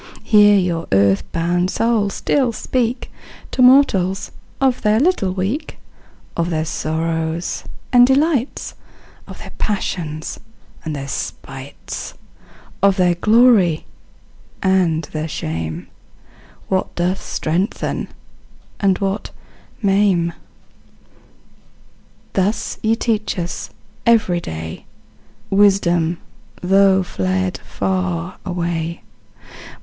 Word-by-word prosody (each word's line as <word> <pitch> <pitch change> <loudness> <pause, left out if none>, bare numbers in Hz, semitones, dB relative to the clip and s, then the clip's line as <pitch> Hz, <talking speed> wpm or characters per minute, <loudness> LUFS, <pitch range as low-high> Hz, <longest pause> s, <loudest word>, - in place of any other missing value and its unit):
Here, 205 -1 +6
your 175 -3 -1
earth 100 0 +3
born 175 +2 +1
souls 215 0 0
still 260 -4 +1
speak 245 +2 -2 0.4
To - - 0
mortals, 205 -8 +4 0.3
of 265 -2 +2
their 215 0 +3
little 280 - +2
week; 200 - -3 0.6
Of 170 0 0
their 155 -2 -1
sorrows 160 +1 -2 0.3
and 245 0 +7
delights; 275 -1 +1 0.5
Of - - -10
their - - -10
passions 160 -7 -3 0.4
and 155 -2 -4
their 140 -1 -5
spites; 135 0 -6 0.7
Of 200 0 +4
their 180 -1 +4
glory 210 -4 +4 0.8
and 180 -4 +2
their 155 0 -3
shame; 80 - -4 0.8
What 185 -1 -1
doth 180 +2 0
strengthen 175 +6 -2 0.7
and 195 -2 +3
what 195 +1 -2 0.5
maim. 195 -4 +2 2.0
Thus 195 +3 -1
ye 225 +1 +2
teach 220 -3 -1
us, 175 0 -4 0.4
every 215 -7 +4
day, 80 - -7 0.7
Wisdom, 175 -4 +3 0.4
though 190 +1 +4
fled 185 0 -1
far 185 -2 -2
away. 170 -2 -3
185 Hz, 95 wpm, -19 LUFS, 165-210 Hz, 2.0 s, and